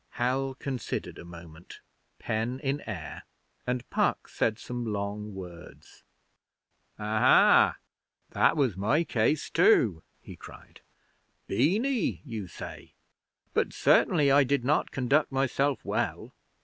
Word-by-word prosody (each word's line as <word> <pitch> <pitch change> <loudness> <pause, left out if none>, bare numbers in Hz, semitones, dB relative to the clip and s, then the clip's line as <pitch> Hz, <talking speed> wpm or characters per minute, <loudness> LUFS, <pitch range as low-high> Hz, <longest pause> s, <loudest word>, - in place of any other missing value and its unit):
Hal 130 +2 -1
considered 135 -2 -5
a - - -9
moment, 85 -1 -12 0.4
pen 115 +3 -3
in 140 +1 -1
air, 90 -9 -6 0.5
and 125 0 -2
Puck - - 0
said 110 - -1
some 120 +1 -6
long 105 -1 -4
words. 90 -2 -12 1.0
'Aha! 110 +1 +4 0.5
that - - +3
was 130 - +1
my 120 - +1
case 140 +1 0
too,' 115 - +4 0.2
he - - -11
cried. - - -14 0.6
'Beany 205 - 0
you 110 -7 -6
say 85 - -10 0.6
but - - 0
certainly 140 -2 +3
I 140 +1 +6
did 135 -1 0
not 150 +3 +1
conduct 135 +4 +1
myself 135 +1 0
well. - - -3
125 Hz, 115 wpm, -28 LUFS, 105-140 Hz, 1.0 s, I